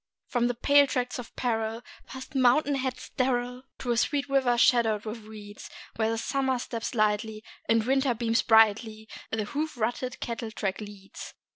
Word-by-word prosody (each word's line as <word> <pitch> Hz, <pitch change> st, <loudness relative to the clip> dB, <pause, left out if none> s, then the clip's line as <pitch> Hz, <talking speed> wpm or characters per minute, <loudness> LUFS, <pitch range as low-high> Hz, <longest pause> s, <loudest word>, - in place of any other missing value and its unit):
From 240 Hz, -1 st, 0 dB
the 245 Hz, -, -1 dB
pale 285 Hz, +3 st, +5 dB
tracts 250 Hz, -1 st, -2 dB
of 240 Hz, -, -9 dB
peril, 225 Hz, -1 st, -2 dB, 0.2 s
past 260 Hz, 0 st, -9 dB
mountain 270 Hz, +3 st, +3 dB
heads 260 Hz, -2 st, -2 dB
sterile, 250 Hz, -1 st, -1 dB, 0.2 s
To 245 Hz, -, -3 dB
a 235 Hz, -, +1 dB
sweet 285 Hz, +4 st, +1 dB
river 265 Hz, -3 st, +2 dB
shadowed 225 Hz, -3 st, +3 dB
with 220 Hz, +2 st, -5 dB
reeds, 210 Hz, -1 st, -10 dB, 0.3 s
Where 225 Hz, 0 st, 0 dB
Summer 265 Hz, +2 st, 0 dB
steps 235 Hz, -1 st, -5 dB
lightly, 215 Hz, 0 st, 0 dB, 0.3 s
and 225 Hz, -1 st, +4 dB
Winter 265 Hz, -1 st, +2 dB
beams 230 Hz, +1 st, +1 dB
brightly, 220 Hz, 0 st, +3 dB, 0.2 s
The 225 Hz, -1 st, -1 dB
hoof 300 Hz, +4 st, -3 dB
rutted 240 Hz, +2 st, -2 dB
cattle 230 Hz, -1 st, -4 dB
track 205 Hz, -2 st, -3 dB
leads. 205 Hz, -2 st, -10 dB
235 Hz, 160 wpm, -27 LUFS, 220-255 Hz, 0.3 s, pale